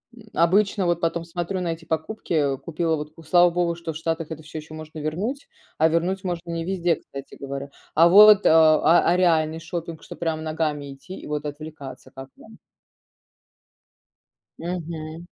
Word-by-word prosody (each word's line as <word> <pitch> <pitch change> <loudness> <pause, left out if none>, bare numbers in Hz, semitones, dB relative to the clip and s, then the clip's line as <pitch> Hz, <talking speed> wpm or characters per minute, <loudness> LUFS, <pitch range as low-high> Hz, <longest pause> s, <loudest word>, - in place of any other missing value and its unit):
м, 215 -2 -16
обычно 195 +3 +3
вот 175 -1 0
потом 165 0 -1
смотрю 175 +2 -3
на 175 - -2
эти 165 0 -12
покупки, 160 +4 -3 0.2
э, - - -12
купила 165 +1 -1
вот, 150 0 -6
ку 165 - -14
слава 175 +3 +5
богу, 170 0 0
что 165 -1 -6
в - - -6
Штатах 165 -1 -3
это 160 -1 -7
всё 155 +1 -7
ещё 155 +1 -11
можно 155 0 -9
вернуть, 195 - -3 0.3
а 160 - +5
вернуть 180 +4 0
можно 175 -2 -4
не 165 0 -3
везде, 175 -2 0
кстати 140 0 -10
говоря. 140 0 -6 0.3
А 165 +2 +7
вот, 210 +2 +8
а 160 -1 +6 0.3
а 175 - +4
реальный 160 -3 +2
шопинг, 165 -1 -6
что - - -9
прям 160 -2 -2
ногами 150 -3 -2
идти 185 +8 -11
и - - -11
вот 150 0 -3
отвлекаться 145 -3 -8
как 135 0 -10
вам? - - -16 2.0
Мгм. 165 -1 -6
165 Hz, 175 wpm, -24 LUFS, 155-175 Hz, 2.0 s, вот